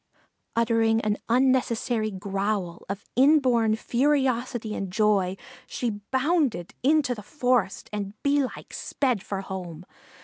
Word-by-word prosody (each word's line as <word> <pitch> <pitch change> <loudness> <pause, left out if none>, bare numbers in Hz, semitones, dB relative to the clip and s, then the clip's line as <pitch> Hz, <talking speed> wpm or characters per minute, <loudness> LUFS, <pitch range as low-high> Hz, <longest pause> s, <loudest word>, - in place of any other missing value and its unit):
Uttering 225 -1 +3
an 210 -1 -1
unnecessary 240 -3 +2
growl 195 -2 -3
of 200 0 -5
inborn 255 -5 +4
ferocity 250 -3 0
and 195 -3 -4
joy 195 -2 +2 0.3
she 240 -2 -2 0.2
bounded 265 - +1
into 285 -1 +3
the 215 - -8
forest, 245 -4 0
and 205 -1 -4
bee 285 0 +3
like 255 - -7
sped 250 -8 -1
for 195 -1 -4
home. 180 -3 -7
225 Hz, 115 wpm, -26 LUFS, 200-255 Hz, 0.3 s, inborn